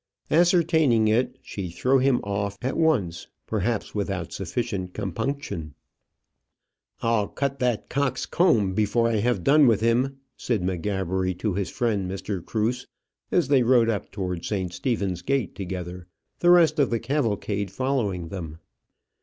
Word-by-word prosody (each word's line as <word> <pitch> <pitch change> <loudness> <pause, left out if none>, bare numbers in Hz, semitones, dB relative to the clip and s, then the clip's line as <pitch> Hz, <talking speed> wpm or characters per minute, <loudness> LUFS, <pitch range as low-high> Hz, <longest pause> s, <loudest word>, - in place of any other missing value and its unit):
Ascertaining 160 - +4
it, 115 +4 +1
she 95 -3 -5
threw 130 +10 +2
him 130 -1 +2
off 100 0 -2
at 130 - -1
once 110 - +1 0.2
perhaps 110 +1 -2
without 95 -4 -3
sufficient 95 -1 -3
compunction. 100 - -4 1.3
"I'll 115 -3 +2
cut 140 -1 -3
that 125 -3 0
cock's 130 -2 -1
comb 115 - +2
before 110 +3 +2
I 115 -1 +1
have 105 -3 0
done 145 - +6
with 110 -3 +3
him," 125 +4 +1 0.2
said 115 -7 -1
M'Gabbery 95 0 -1
to 100 +2 -2
his 100 0 -2
friend 105 -6 -1
Mr. 95 -1 -4
Cruse, 115 +3 -1 0.4
as 175 -6 +2
they 140 -2 +4
rode 120 -1 +4
up 105 - -4
towards 90 -4 -4
St. 95 -4 -2
Stephen's 100 -5 -2
gate 135 -6 -1
together, 90 -2 -6 0.3
the 175 - +3
rest 170 -3 +5
of 140 - +3
the 115 - 0
cavalcade 110 -6 -1
following 100 -7 -1
them. 85 -5 -6
110 Hz, 145 wpm, -25 LUFS, 95-130 Hz, 1.3 s, done